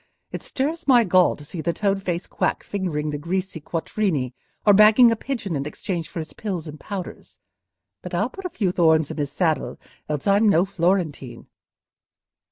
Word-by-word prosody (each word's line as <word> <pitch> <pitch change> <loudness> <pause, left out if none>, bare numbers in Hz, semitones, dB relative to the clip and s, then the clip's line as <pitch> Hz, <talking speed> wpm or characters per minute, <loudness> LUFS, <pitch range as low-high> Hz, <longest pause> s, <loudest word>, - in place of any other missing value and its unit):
It - - -5
stirs 310 +5 -3
my 245 -3 +6
gall 185 -2 +4
to 145 - -12
see 165 +2 -6
the 170 +2 -1
toad 195 +2 0
faced 175 -2 -3
quack - - -1
fingering 155 -7 -2
the 145 - -4
greasy 180 +1 -3
quattrini, 160 - -2 0.3
or 205 - +7
bagging 215 +4 +7
a - - +2
pigeon 220 - -4
in 140 0 -2
exchange 170 +2 -4
for - - -10
his 160 -1 -5
pills 185 -7 -4
and 150 0 -9
powders. 195 -3 -7 0.6
But - - -6
I'll - - 0
put 390 - -10
a - - -1
few 195 - -1
thorns 160 -4 +3
in - - -7
his 145 -2 -2
saddle, 155 -7 -1 0.3
else 150 -2 -3
I'm 205 +2 +4
no 175 -1 +4
Florentine. 170 -10 -1
180 Hz, 180 wpm, -23 LUFS, 155-205 Hz, 0.6 s, or